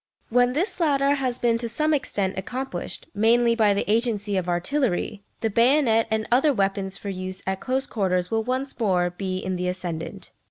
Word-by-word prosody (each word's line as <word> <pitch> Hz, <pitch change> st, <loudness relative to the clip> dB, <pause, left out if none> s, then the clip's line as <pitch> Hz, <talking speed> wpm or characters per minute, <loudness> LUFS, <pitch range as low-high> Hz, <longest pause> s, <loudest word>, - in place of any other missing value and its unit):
When 245 Hz, +1 st, +3 dB
this 355 Hz, -, -1 dB
latter 280 Hz, -4 st, +3 dB
has 260 Hz, -3 st, -1 dB
been 230 Hz, -2 st, +1 dB
to 235 Hz, -1 st, -2 dB
some 305 Hz, +6 st, +2 dB
extent 200 Hz, -9 st, 0 dB
accomplished, 255 Hz, +8 st, -5 dB
mainly 235 Hz, +2 st, +4 dB
by 215 Hz, -3 st, +3 dB
the 200 Hz, -, -1 dB
agency 210 Hz, -2 st, 0 dB
of 180 Hz, -2 st, -1 dB
artillery, 200 Hz, +2 st, -1 dB, 0.2 s
the 225 Hz, -, +1 dB
bayonet 235 Hz, 0 st, +4 dB
and 220 Hz, 0 st, -1 dB
other 270 Hz, +3 st, +4 dB
weapons 195 Hz, -1 st, -1 dB
for 200 Hz, -, -6 dB
use 185 Hz, 0 st, -5 dB
at 190 Hz, 0 st, -2 dB
close 265 Hz, +1 st, -1 dB
quarters 185 Hz, -6 st, -1 dB
will 225 Hz, 0 st, +1 dB
once 260 Hz, +3 st, -3 dB
more 180 Hz, -5 st, +2 dB
be 185 Hz, +1 st, -3 dB
in 185 Hz, 0 st, -3 dB
the 180 Hz, 0 st, -2 dB
ascendant. 175 Hz, -3 st, -5 dB
220 Hz, 185 wpm, -24 LUFS, 190-255 Hz, 0.2 s, mainly